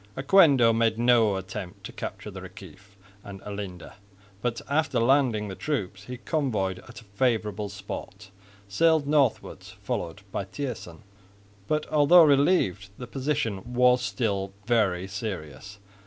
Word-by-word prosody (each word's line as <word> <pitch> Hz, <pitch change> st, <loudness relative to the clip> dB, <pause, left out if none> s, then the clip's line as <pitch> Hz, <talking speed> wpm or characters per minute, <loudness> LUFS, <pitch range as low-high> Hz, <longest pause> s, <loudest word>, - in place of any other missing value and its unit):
Oquendo 135 Hz, -6 st, +5 dB
made 115 Hz, -1 st, +1 dB
no 115 Hz, -3 st, +4 dB
attempt 95 Hz, -1 st, -7 dB
to -, -, -7 dB
capture 105 Hz, -, -7 dB
the 95 Hz, -1 st, -9 dB
Reciff 95 Hz, +1 st, -13 dB, 0.3 s
and 100 Hz, -1 st, -9 dB
Olinda, 100 Hz, -3 st, -7 dB, 0.5 s
but, 120 Hz, 0 st, -2 dB
after 145 Hz, -3 st, +1 dB
landing 120 Hz, -4 st, +2 dB
the 95 Hz, -, -6 dB
troops 100 Hz, -6 st, -4 dB
he 125 Hz, +2 st, -7 dB
convoyed 115 Hz, -, -1 dB
at 120 Hz, 0 st, -11 dB
a -, -, -17 dB
favourable 105 Hz, -2 st, -1 dB
spot, 100 Hz, 0 st, -8 dB, 0.4 s
sailed 155 Hz, +9 st, +2 dB
northwards, 140 Hz, -4 st, 0 dB
followed 85 Hz, +3 st, -4 dB
by 100 Hz, -, -2 dB
Thijssen. 100 Hz, -, -7 dB, 0.6 s
But 155 Hz, +4 st, 0 dB
though 155 Hz, +3 st, +7 dB
relieved 140 Hz, -, +2 dB
the 125 Hz, -, -7 dB
position 125 Hz, -5 st, -3 dB
was 125 Hz, 0 st, +4 dB
still 100 Hz, -6 st, -2 dB
very 100 Hz, -6 st, +1 dB
serious. 100 Hz, -, -6 dB
110 Hz, 130 wpm, -26 LUFS, 100-135 Hz, 0.6 s, though